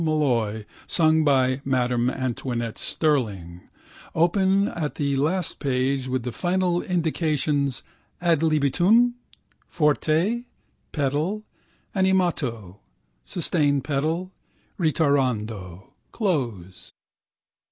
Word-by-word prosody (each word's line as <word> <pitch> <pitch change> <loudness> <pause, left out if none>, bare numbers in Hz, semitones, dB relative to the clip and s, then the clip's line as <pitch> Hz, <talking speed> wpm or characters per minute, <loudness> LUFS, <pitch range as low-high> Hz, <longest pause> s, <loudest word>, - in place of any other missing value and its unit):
Molloy, 120 -9 0 0.2
sung 160 -2 +3
by 130 -2 +2
Madam 125 -2 +1
Antoinette 120 -3 -3
Sterling) 100 - -1 0.5
open 190 +4 +3
at 155 -4 -4
the 140 -2 0
last 160 +6 0
page 130 -1 0
with 130 -1 -2
the 125 - -3
final 175 - 0
indications 155 -5 0 0.4
ad 170 -3 +2
libitum, 175 - +3 0.5
forte, 165 +9 +1 0.5
pedal, 155 +9 -1 0.5
animato, 160 - 0 0.5
sustained 145 -5 +1
pedal, 155 +6 -1 0.5
ritirando, 115 - 0 0.2
close. 120 - -3
145 Hz, 80 wpm, -24 LUFS, 125-170 Hz, 0.5 s, sung